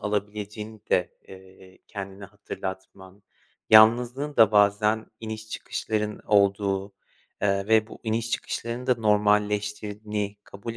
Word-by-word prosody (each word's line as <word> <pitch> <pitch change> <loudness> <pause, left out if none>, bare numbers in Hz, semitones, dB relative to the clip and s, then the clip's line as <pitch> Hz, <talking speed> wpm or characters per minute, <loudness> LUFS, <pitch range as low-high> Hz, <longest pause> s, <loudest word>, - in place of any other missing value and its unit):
alabileceğini 105 +1 -4
de, 90 - +2 0.2
eee, 95 0 -15
kendine 100 -1 -7
hatırlatman, 95 0 -8 0.5
yalnızlığın 120 +6 +5
da 110 -2 +6
bazen 105 +1 +3
iniş 110 0 -7
çıkışların 105 -1 -3
olduğu, 100 -1 +2 0.5
eee, 100 -1 +1
ve 110 -1 +4
bu - - -12
iniş 115 0 -2
çıkışların 120 +3 -4
da 125 - +4
normalleştirdiğini 105 -1 0
kabul 115 +4 -8
105 Hz, 105 wpm, -25 LUFS, 100-110 Hz, 0.5 s, da